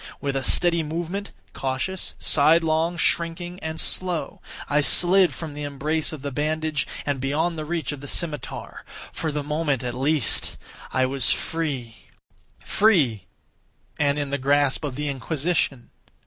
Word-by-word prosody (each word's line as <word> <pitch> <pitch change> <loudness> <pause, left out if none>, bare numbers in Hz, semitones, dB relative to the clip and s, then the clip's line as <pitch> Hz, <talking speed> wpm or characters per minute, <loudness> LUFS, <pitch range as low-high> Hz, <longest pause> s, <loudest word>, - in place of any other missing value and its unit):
With 140 -1 -2
a 135 - 0
steady 170 +2 +2
movement—cautious, 170 -1 -4
sidelong, 160 +2 +3
shrinking, 170 +2 0
and 160 0 -5
slow—I 165 -4 -1
slid 180 +7 +6
from 160 -3 -7
the 150 - -7
embrace 150 +2 -1
of 150 -4 -8
the 140 - -3
bandage 155 +1 -1 0.2
and 145 -2 -1
beyond 155 +6 0
the 155 -1 -5
reach 160 -3 -2
of 145 -2 -7
the 145 - -8
scimitar. 150 -3 -3 0.3
For 160 - -2
the 150 0 -3
moment, 150 -3 -1
at 125 -1 -3
least, 140 +2 +2 0.3
I 130 - +2
was 130 -2 +2
free. 140 -9 -3 0.7
Free!—and 145 - -1
in 145 -1 -3
the 140 - -1
grasp 140 +2 +2
of 140 -4 -3
the 150 +2 -3
Inquisition! 140 -1 -1
150 Hz, 135 wpm, -24 LUFS, 140-165 Hz, 0.7 s, slid